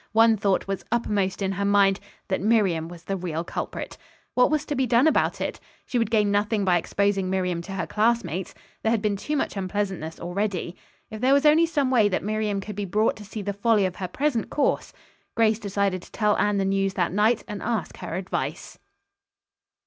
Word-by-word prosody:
One 225 0 +6
thought 200 -2 +1
was 195 -1 -3
uppermost 205 -5 0
in 190 - 0
her 195 +1 -2
mind, 200 -1 +4 0.3
that 190 - -1
Miriam 195 -7 +2
was 170 0 -11
the 195 - -2
real 170 -3 -3
culprit. - - -5 0.3
What 250 - +4
was 305 0 0
to 295 - -3
be 260 -1 +1
done 240 +3 +4
about 315 - +2
it? - - -3 0.3
She 245 - -1
would 230 -3 0
gain 210 -3 +2
nothing 205 0 +1
by 180 -2 +4
exposing 195 +1 0
Miriam 180 -2 -1
to 195 +3 -8
her 185 -3 -2
classmates. 210 -2 0 0.3
There 220 - +1
had 225 -2 +1
been 210 -1 +1
too 295 +9 -2
much - - -2
unpleasantness 190 -4 -3
already. 180 0 -2 0.4
If 215 0 -7
there 260 +2 +4
was 280 +2 +2
only 315 +3 +6
some 290 -5 0
way 220 -5 +4
that 185 - -1
Miriam 210 -1 -1
could 210 +1 -7
be 205 - -3
brought 210 +4 +1
to 210 - -10
see 210 +1 -6
the 200 +1 -2
folly 205 0 +2
of 185 -1 -3
her 185 - -3
present 265 +4 -1
course. 290 - 0 0.4
Grace 220 -1 +3
decided 200 -3 -1
to - - -16
tell 210 -1 +2
Anne 205 -1 +2
the 195 - +1
news 195 0 0
that 175 -1 0
night 215 +3 +2
and 205 -1 -6
ask 225 -3 -2
her 165 - -5
advice. 185 +1 -4
205 Hz, 210 wpm, -25 LUFS, 190-225 Hz, 0.4 s, One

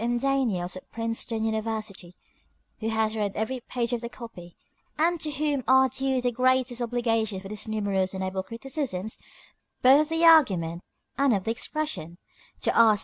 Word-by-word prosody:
M. 240 +1 0
Daniels, 235 -10 0
of 185 - -11
Princeton 230 0 -2
University, 220 -5 -3 0.6
who 225 - -2
has 220 0 0
read 205 -2 -1
every 220 +4 -2
page 240 0 -2
of 235 - -1
the 235 - -5
copy, 180 -9 -11 0.4
and 335 +2 +2
to 310 - -1
whom 290 -2 -1
are 265 0 +6
due 265 +1 0
the 245 0 0
greatest 255 0 +1
obligations 225 -4 0
for 195 - -8
his 215 +2 -3
numerous 200 -3 -1
and 190 - -3
able 190 0 -2
criticisms 230 -1 -4 0.6
both 265 +3 +7
of 305 - -2
the 325 +1 +2
argument 185 - +5 0.4
and 275 -5 +4
of 195 - -2
the 225 - 0
expression; 235 - -4 0.4
to - - +1
R. 225 -2 +6
230 Hz, 170 wpm, -26 LUFS, 205-260 Hz, 0.6 s, both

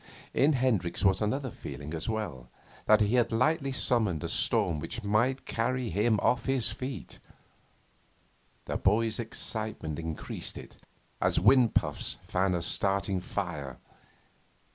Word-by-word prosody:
In 150 +3 +4
Hendricks 110 -9 0
was 95 +1 +3
another 130 +5 -1
feeling 70 -1 -8
as 80 +4 -4
well 85 - -4 0.4
that 110 0 +6
he 105 +2 +2
had 120 -2 +3
lightly 140 +5 +1
summoned 110 - +1
a - - -3
storm 80 -3 +1
which 115 +9 -6
might 120 +6 +1
carry 125 0 -1
him 105 +4 +2
off 125 +2 +2
his 135 -3 +1
feet. 130 0 -6 1.5
The - - -2
boy's 110 +3 +2
excitement 110 -8 -2
increased 80 -1 -5
it, - - -11 0.4
as - - +2
wind 125 -5 +5
puffs - - 0
fan 95 0 +1
a 85 - -2
starting 100 +1 +1
fire. 85 -8 -4
110 Hz, 135 wpm, -29 LUFS, 90-125 Hz, 1.5 s, that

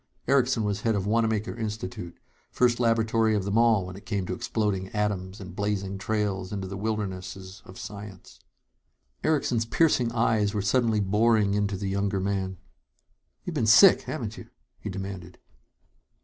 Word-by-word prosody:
Erickson 130 -4 +3
was 100 -1 -1
head 115 -1 +1
of 100 -2 -1
Wanamaker 110 -1 0
Institute, 105 -6 -5 0.3
first 120 -1 +2
laboratory 115 -1 +2
of 100 - 0
them 100 +2 -2
all 115 -4 +4
when 90 0 -8
it 100 - -13
came 100 -4 -1
to 90 - -3
exploding 100 -1 -1
atoms 100 -1 -2
and 90 -3 -9
blazing 100 -1 -2
trails 100 -3 -2
into 100 -2 -4
the 100 - -6
wildernesses 95 -2 -4
of 95 - -12
science. 100 -3 -9 0.8
Erickson's 130 -7 +1
piercing 125 -5 +2
eyes 110 -3 +1
were 105 - 0
suddenly 115 0 +2
boring 105 +1 +3
into 100 -1 0
the 100 +1 -4
younger 100 0 0
man. 95 -1 -2 0.9
"You've 180 - -4
been 120 -8 0
sick, 170 - +8
haven't 115 -7 -5
you?" 115 - -12 0.3
he 105 - -6
demanded. 95 -2 -7
105 Hz, 155 wpm, -27 LUFS, 95-115 Hz, 0.9 s, sick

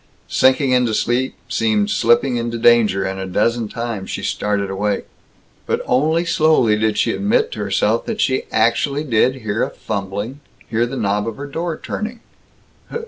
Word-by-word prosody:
Sinking 130 +1 +3
into 125 -3 +2
sleep 125 +4 0
seemed 110 -4 +1
slipping 120 +2 +3
into 115 0 -2
danger, 115 -4 +4
and 95 0 -3
a 95 - -4
dozen 115 +4 0
times 115 -3 -5
she - - -4
started 100 -1 -1
awake. 100 +1 -1 0.6
But - - 0
only 160 +7 +2
slowly 155 -9 +3
did 110 -1 0
she - - +2
admit 240 - +1
to - - -6
herself - - 0
that 225 -2 -3
she 130 0 +1
actually 140 +6 +1
did 130 -1 +2
hear 110 -3 -3
a - - +1
fumbling, 100 +5 -5 0.3
hear 115 +1 0
the 135 +2 -5
knob 105 -1 0
of 115 - -5
her 140 - -6
door 165 +3 -3
turning. 220 +2 -5
120 Hz, 165 wpm, -19 LUFS, 105-135 Hz, 0.6 s, danger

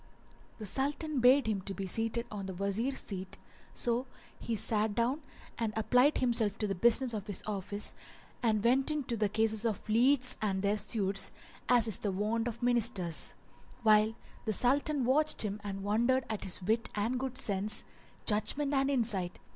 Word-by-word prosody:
The 215 - -7
Sultan 285 - -1
bade 255 +3 +5
him 215 -3 -1 0.2
be 195 - -4
seated 225 +4 -1
on 200 -2 -5
the 190 - -6
Wazir's 200 +8 0
seat, 190 -2 -4 0.4
so 240 +2 0 0.3
he 230 - -3
sat 215 0 0
down 250 +6 0 0.4
and 225 -2 -1
applied 250 +6 +3
himself 230 -4 +1
to 215 - -1
the 200 - -1
business 235 +5 +3
of 210 -1 -5
his 205 - -4
office 205 0 -4 0.5
and 215 -3 +1
went 260 +4 +3
into 285 -6 -1
the 210 -2 0
cases 220 +1 0
of 220 -4 -2
the 215 - -2
lieges 255 +2 +3
and 195 -2 -1
their 200 +1 +1
suits, 200 -2 0 0.4
as 240 -2 +4
is 215 - -1
the 205 - -2
wont 215 +4 -1
of 235 +1 -6
Ministers; 230 -8 +3 0.5
while 215 0 +4 0.3
the 220 - 0
Sultan 275 +4 +2
watched 300 +3 +2
him 210 0 -4
and 195 -1 -5
wondered 235 +6 +1
at 215 - -3
his 185 0 -1
wit 225 +4 0
and 225 +5 -1
good 260 -1 -4
sense, 205 -1 +1 0.4
judgement 275 +7 0
and 270 0 +2
insight. 220 -9 +2
225 Hz, 170 wpm, -31 LUFS, 205-250 Hz, 0.5 s, bade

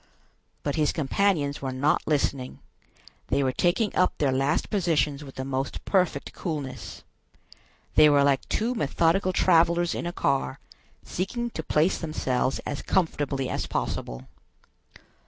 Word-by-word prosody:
But 145 0 -2
his 150 -2 +2
companions 155 -2 0
were 135 -1 -3
not 140 +4 +1
listening; 140 -3 -1 0.7
they 140 - +1
were 130 - +1
taking 180 - +1
up 185 - +2
their 145 -3 +1
last 135 +3 0
positions 160 -7 +1
with 135 -2 -11
the 130 - -4
most 135 0 -3
perfect 180 -7 0
coolness. 150 -7 -5 0.9
They 155 0 +7
were 145 -1 +5
like 140 -1 +1
two 230 +3 0
methodical 170 - +1
travelers 170 -1 +3
in - - -3
a - - -2
car, 135 - -1 0.4
seeking 235 +6 -3
to 160 - -4
place 155 +3 +1
themselves 135 -5 -1
as 145 - -3
comfortably 145 -7 0
as - - -3
possible. 60 +1 -4
150 Hz, 140 wpm, -26 LUFS, 135-175 Hz, 0.9 s, They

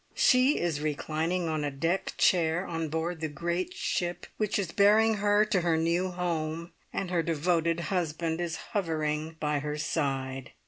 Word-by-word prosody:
She 255 +3 +4
is 165 -4 -1
reclining 160 +3 -1
on 155 -2 -1
a 145 - 0
deck 165 +7 -1
chair 175 0 +3
on 165 -2 -3
board 160 +1 -2
the 160 - 0
great 170 +4 -3
ship 175 0 -2
which 215 -2 0
is 190 -5 -2
bearing 215 +3 +5
her 205 +1 +3
to 205 -4 +1
her 170 -2 +2
new 170 +3 +1
home, 170 -2 -3 0.2
and 185 -2 -3
her 175 -2 +2
devoted 165 +1 +1
husband 165 -1 -1
is 170 -2 -2 0.2
hovering 160 -4 -1
by 150 -1 0
her 150 +1 -3
side. 135 -3 -2
165 Hz, 165 wpm, -29 LUFS, 155-180 Hz, 0.2 s, bearing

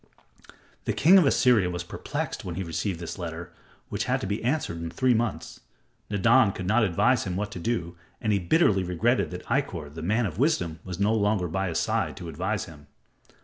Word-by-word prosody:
The - - 0
king 185 +6 +6
of 165 - +4
Assyria 120 -9 +4
was 90 0 -4
perplexed 85 - -5
when 90 -3 -5
he 95 - -3
received 85 +2 -3
this 85 +3 -6
letter 85 0 -6 0.4
which - - -2
had - - +1
to - - -3
be 100 +3 -3
answered 120 - -1
in 85 - -4
three 130 +8 +2
months. 115 -2 -2 0.5
Nadan 110 +1 +4
could 95 - -5
not 110 +5 +3
advise 90 -5 +2
him 90 - -3
what 105 +2 -3
to - - -6
do, 90 -4 -2 0.2
and 110 -2 0
he 100 - +2
bitterly 95 - +3
regretted 100 +8 +1
that 90 0 -8
Ikkor, 95 - -2
the 80 - -7
man 110 +8 +1
of 100 0 -5
wisdom, 90 - +1
was 90 -1 -6
no 105 +2 +2
longer 105 -4 +1
by 95 +3 -2
his 85 - -2
side - - -1
to - - -7
advise - - -2
him. 75 -3 -14
95 Hz, 205 wpm, -26 LUFS, 85-115 Hz, 0.5 s, king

